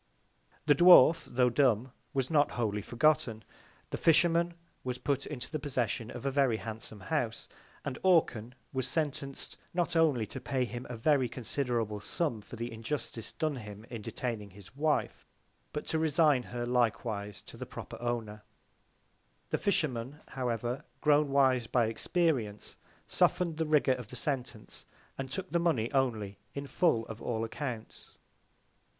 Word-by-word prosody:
The 145 - +6
Dwarf, 165 0 +8
tho' 125 0 +3
dumb, 125 -2 +3 0.2
was 135 0 -1
not 145 -2 +3
wholly 105 -3 -1
forgotten. 120 -1 +1 0.5
The - - -3
Fisherman 170 +1 +4 0.3
was 125 -1 -3
put 140 +1 -1
into 130 -5 -6
the 155 - -2
Possession 125 -5 -2
of 120 +1 -7
a 140 - +1
very 135 -5 +3
handsome 110 -1 -7
House; 95 - -2 0.4
and 135 -2 -4
Orcan 125 - +3 0.2
was 130 -1 -1
sentenc'd, 140 -1 -3 0.2
not 175 -1 0
only 150 -9 +3
to 130 - -7
pay 130 -1 0
him 120 +2 -6
a 125 - -5
very 130 +1 +3
considerable 115 -4 -2
Sum 120 0 -1
for 110 - -10
the 120 +1 -4
Injustice 115 -1 -4
done 155 -4 -1
him 105 -2 -9
in 115 -3 -5
detaining 110 -2 -4
his 100 +5 -15
Wife; 150 +1 0 0.4
but 150 - -4
to 160 - +1
resign 155 -3 +4
her 120 0 -3
likewise 110 -4 0
to - - -12
the - - -7
proper - - -8
Owner: 115 -3 -3 1.1
The - - +1
Fisherman, 145 - 0
however, 120 0 -2 0.2
grown 150 -1 +4
wise 130 -4 +3
by 120 -1 +3
Experience, 115 - -1 0.3
soften'd 175 -3 +2
the 160 -1 0
Rigour 150 -3 +4
of 125 -4 -6
the 125 - -9
Sentence, 125 -4 -4 0.3
and 135 -1 -3
took 185 +7 -5
the 170 - +2
Money 140 -10 +1
only 110 -7 0 0.2
in 140 0 -4
full 135 -4 +2
of 110 0 -8
all 115 -2 -1
Accounts. 115 -1 -6
125 Hz, 155 wpm, -31 LUFS, 115-150 Hz, 1.1 s, Dwarf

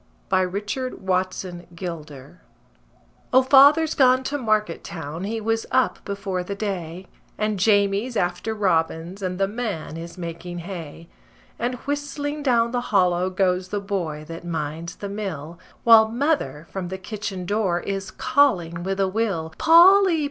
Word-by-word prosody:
CHAMBER'S 185 +2 +1 0.4
"Tracts." 185 0 -1
A 185 - -6
MIDSUMMER 175 0 -11
SONG 155 -3 -7 0.9
O, 260 +1 +6
father's 285 +4 +6
gone 255 -1 +4
to 290 +2 -2
market 215 -3 0
town, 160 +1 -6
he 225 +2 -2
was 225 +1 -1
up 260 0 +1
before 200 -3 -3
the 200 +2 -5
day, 185 -4 -4 0.3
And 215 -2 -1
Jamie's 205 +3 +2
after 180 +5 -1
robins, 170 -1 0
and 185 -1 -3
the 195 0 +1
man 205 -8 -4
is 170 +2 -8
making 170 0 -6
hay, 170 -2 -8 0.5
And 245 +2 -1
whistling 290 +1 -3
down 235 -4 +2
the 245 0 -1
hollow 180 -2 +2
goes 185 -1 0
the 205 +2 -2
boy 175 -7 -3
that 165 0 -8
minds 165 0 -4
the 200 - -6
mill, 175 -6 -6 0.2
While 225 -1 +7
mother 245 - -1
from 190 -2 -4
the 190 +2 -5
kitchen 195 -2 -5
door 195 -3 0
is 195 0 -4
calling 215 -12 +1
with 190 +2 -3
a 195 - +3
will: 190 -6 -2
"Polly! 355 +1 +7
195 Hz, 150 wpm, -23 LUFS, 175-225 Hz, 0.9 s, While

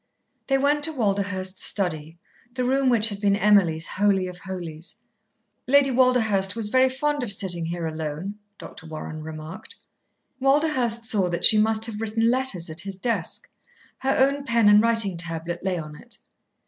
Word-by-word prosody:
They 270 - +2
went 290 +2 +1
to 320 - -3
Walderhurst's 195 -5 -2
study, 165 -4 -3 0.4
the 255 - -1
room 265 +1 +1
which 225 -2 +3
had 200 -1 -7
been 200 -1 +2
Emily's 195 -6 +3
holy 195 -1 +1
of 180 -1 -8
holies. 175 -3 -7 0.7
"Lady 275 0 +4
Walderhurst 225 -6 +2
was 220 -2 0
very 260 +2 +3
fond 290 +2 -2
of 240 -5 -2
sitting 175 -4 +1
here 170 0 -4
alone," 160 +4 -5 0.2
Dr. 160 - -12
Warren 155 0 -7
remarked. 155 +2 -9 0.6
Walderhurst 265 -4 +1
saw 200 -5 0
that 170 - +1
she 215 - +7
must 220 +1 +2
have 220 -2 -4
written 225 +1 +1
letters 255 -10 +1
at 160 0 -5
his 195 +1 -4
desk. 195 -3 -3 0.5
Her 270 0 0
own 275 +2 +2
pen 230 -5 +2
and 210 0 +6
writing 225 -5 +1
tablet 165 +1 -3
lay 190 -2 -1
on 155 -2 -7
it. - - -11
205 Hz, 165 wpm, -24 LUFS, 175-245 Hz, 0.7 s, she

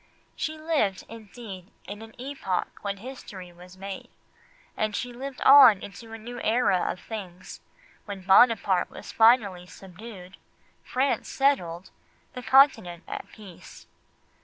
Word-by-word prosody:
She 315 0 -4
lived, 300 - -1
indeed, 215 -4 -10 0.2
in 205 +2 -8
an 225 0 -12
epoch 255 -9 -3
when 200 -1 -4
history 195 -6 -10
was 180 +2 -15
made, 195 0 -8 0.7
and 215 -1 -2
she 245 0 -4
lived 265 +2 -7
on 265 -8 +8
into 225 +3 -10
a 225 - -7
new 240 +2 -8
era 220 -5 +1
of - - -8
things, 190 -4 -9 0.4
when 200 -2 -7
Buonaparte 195 -1 +4
was - - -10
finally 215 -6 +3
subdued, 190 +1 -12 0.5
France 265 +2 -1
settled, 185 -11 0 0.4
the 250 - -7
Continent 225 -9 +3
at - - -6
peace. 200 -6 -14
210 Hz, 130 wpm, -26 LUFS, 185-245 Hz, 0.7 s, on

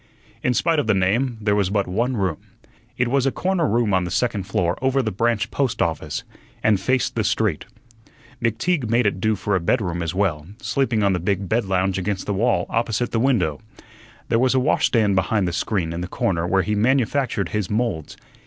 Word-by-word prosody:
In 125 - +1
spite 165 +2 +2
of 145 - -1
the 110 - +3
name, 115 +7 +1
there 105 -1 +1
was 100 -2 +1
but 100 -1 +1
one 120 +7 -1
room. 95 -6 -1 0.6
It 125 - +1
was 135 +2 +1
a - - +2
corner 180 -1 0
room 115 -2 +1
on 95 -1 +3
the 90 - -3
second 105 -1 -1
floor 85 0 0
over 135 +1 +2
the 110 - -1
branch 115 +2 0
post 135 -4 -1
office, 80 -2 -2 0.4
and 105 -3 +3
faced 125 +6 0
the - - 0
street. - - 0 0.8
McTeague 120 - 0
made 115 +1 +2
it 95 -2 0
do 110 +1 +2
for 100 +1 -1
a - - +2
bedroom 85 -2 0
as 85 +1 -3
well, 85 -6 0
sleeping 120 -6 0
on 100 -1 +3
the 90 - 0
big 95 +2 -1
bed 115 +3 +1
lounge 95 0 0
against 95 0 -2
the 105 - -1
wall 115 +6 +1
opposite 115 +1 -1
the 115 - 0
window. 110 - +1 0.7
There 115 - +2
was 130 +1 +2
a - - +4
washstand 115 -6 +2
behind 95 +1 +1
the 85 - -2
screen 90 -3 -1
in 85 - -4
the 90 - -4
corner 85 -2 -1
where 95 +1 +2
he 105 - -1
manufactured 125 0 +1
his 105 -3 -2
moulds. 105 -8 -2
105 Hz, 210 wpm, -22 LUFS, 95-120 Hz, 0.8 s, a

